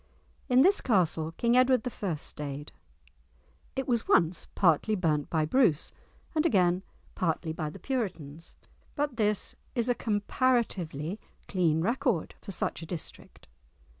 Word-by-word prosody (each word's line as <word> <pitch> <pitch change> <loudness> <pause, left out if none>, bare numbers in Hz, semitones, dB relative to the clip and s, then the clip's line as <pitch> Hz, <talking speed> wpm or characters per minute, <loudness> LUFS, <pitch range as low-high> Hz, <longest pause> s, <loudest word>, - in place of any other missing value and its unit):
In 255 +1 +6
this 390 +4 +4
castle 165 -7 +1
King 235 +6 +1
Edward 255 -2 +4
I. 185 -6 0
stayed. 145 -1 -6 1.0
It 265 -1 -2
was 235 -3 0
once 170 0 +3
partly 185 +4 +3
burnt 155 -6 0
by 155 -2 +1
Bruce, 195 - +2 0.4
and 310 -2 +2
again 185 - +3 0.3
partly 165 -2 -1
by 155 -2 -3
the - - -10
Puritans, 170 - -4 0.4
but 285 -4 -1
this 210 -2 +1 0.2
is 240 0 +1
a - - +5
comparatively 205 - 0 0.3
clean 165 -5 +1
record 235 - 0
for - - -11
such 185 - -1
a 165 - -8
district! 165 -2 -7
190 Hz, 135 wpm, -29 LUFS, 160-245 Hz, 1.0 s, In